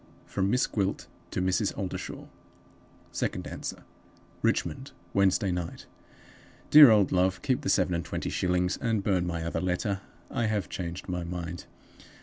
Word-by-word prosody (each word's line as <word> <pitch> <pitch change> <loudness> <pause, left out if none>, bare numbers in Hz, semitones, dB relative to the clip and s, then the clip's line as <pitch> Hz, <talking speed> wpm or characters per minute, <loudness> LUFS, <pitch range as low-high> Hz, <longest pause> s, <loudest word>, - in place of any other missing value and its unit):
From 95 -1 -1
Miss 125 +3 +3
Gwilt 100 -2 -1 0.2
to 90 - -2
Mrs. 95 +3 0
Oldershaw. 95 -3 -5 0.9
(Second - - -2
Answer.) - - -6 0.6
"Richmond, - - -1 0.2
Wednesday 100 0 +3
Night. 90 -1 -4 0.9
"DEAR 150 -3 +11
OLD 105 -4 +4
LOVE 95 0 +1
Keep 130 +1 +1
the 135 - -2
seven 90 -2 +2
and 85 0 -1
twenty - - -4
shillings, 90 0 +1
and 115 -4 0
burn 90 -4 +1
my 85 -1 -2
other 80 0 -2
letter. 95 +2 -1 0.3
I 120 -3 0
have 105 -3 -1
changed 85 -1 -5
my 90 -1 -2
mind. 85 -1 -5
95 Hz, 145 wpm, -28 LUFS, 90-105 Hz, 0.9 s, DEAR